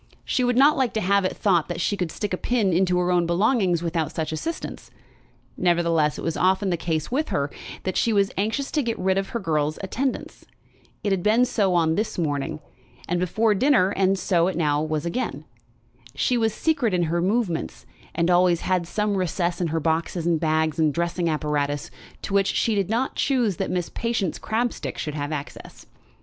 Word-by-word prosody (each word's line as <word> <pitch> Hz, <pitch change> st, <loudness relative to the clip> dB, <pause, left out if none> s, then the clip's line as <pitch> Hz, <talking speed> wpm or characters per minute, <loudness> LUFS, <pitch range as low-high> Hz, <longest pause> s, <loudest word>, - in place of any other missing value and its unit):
She 255 Hz, -, 0 dB
would 245 Hz, 0 st, +1 dB
not 285 Hz, +3 st, +6 dB
like 260 Hz, -3 st, +1 dB
to -, -, +2 dB
have 200 Hz, -1 st, +2 dB
it -, -, -2 dB
thought 175 Hz, -6 st, +2 dB
that 175 Hz, -1 st, -4 dB
she 205 Hz, -, 0 dB
could 180 Hz, -5 st, -3 dB
stick 205 Hz, +1 st, -4 dB
a -, -, 0 dB
pin 215 Hz, -6 st, +1 dB
into 180 Hz, +1 st, +2 dB
her 180 Hz, 0 st, +1 dB
own 175 Hz, -1 st, +2 dB
belongings 185 Hz, -1 st, +2 dB
without 165 Hz, -2 st, -1 dB
such 160 Hz, -1 st, -3 dB
assistance. 320 Hz, -, -5 dB, 0.7 s
Nevertheless 170 Hz, -4 st, +2 dB
it -, -, -6 dB
was 165 Hz, -, -1 dB
often 190 Hz, +1 st, +2 dB
the -, -, +2 dB
case 160 Hz, 0 st, -2 dB
with 300 Hz, +5 st, 0 dB
her, 145 Hz, -7 st, -1 dB, 0.3 s
that 185 Hz, -, -2 dB
she 230 Hz, -, +2 dB
was 200 Hz, -2 st, +2 dB
anxious 220 Hz, +8 st, -1 dB
to 300 Hz, -, +1 dB
get 235 Hz, -3 st, -2 dB
rid 190 Hz, +1 st, +1 dB
of 195 Hz, -, -4 dB
her 235 Hz, -, -3 dB
girl's 155 Hz, -5 st, -1 dB
attendance. 255 Hz, +7 st, -3 dB, 0.6 s
It 205 Hz, -, 0 dB
had 190 Hz, -2 st, +1 dB
been 220 Hz, +6 st, +4 dB
so 200 Hz, -7 st, +1 dB
on 160 Hz, -2 st, +3 dB
this 210 Hz, +6 st, -2 dB
morning, 155 Hz, -1 st, -2 dB, 0.5 s
and 175 Hz, 0 st, 0 dB
before 210 Hz, +5 st, +2 dB
dinner, 210 Hz, -3 st, +3 dB
and 190 Hz, -1 st, +2 dB
was 195 Hz, -, -3 dB
so 175 Hz, -1 st, +2 dB
now 150 Hz, -5 st, 0 dB
again. 155 Hz, -, -2 dB, 0.7 s
She 250 Hz, -, +1 dB
was 225 Hz, -2 st, +2 dB
secret 245 Hz, -, 0 dB
in 175 Hz, -, +2 dB
her 170 Hz, +1 st, 0 dB
movements, 195 Hz, -3 st, -1 dB, 0.3 s
and 170 Hz, +1 st, +2 dB
always 175 Hz, -1 st, +4 dB
had 180 Hz, -2 st, 0 dB
some 210 Hz, +2 st, -1 dB
recess 175 Hz, -1 st, -1 dB
in 175 Hz, -, +1 dB
her 165 Hz, +1 st, -1 dB
boxes 165 Hz, +2 st, -1 dB
and 170 Hz, -2 st, +2 dB
bags 160 Hz, 0 st, 0 dB
and 155 Hz, -2 st, +3 dB
dressing 170 Hz, +2 st, -1 dB
apparatuses 145 Hz, -2 st, -1 dB, 0.3 s
to -, -, -4 dB
which 195 Hz, -1 st, +3 dB
she 225 Hz, -, +1 dB
did 200 Hz, -2 st, 0 dB
not 240 Hz, +4 st, 0 dB
choose 240 Hz, -, +1 dB
that -, -, -2 dB
Miss 180 Hz, -2 st, -2 dB
Patience 230 Hz, -7 st, -2 dB
Crabstick 235 Hz, +2 st, -2 dB
should 150 Hz, -, -4 dB
have 145 Hz, 0 st, -4 dB
access. 145 Hz, -2 st, -7 dB
180 Hz, 200 wpm, -24 LUFS, 165-215 Hz, 0.7 s, not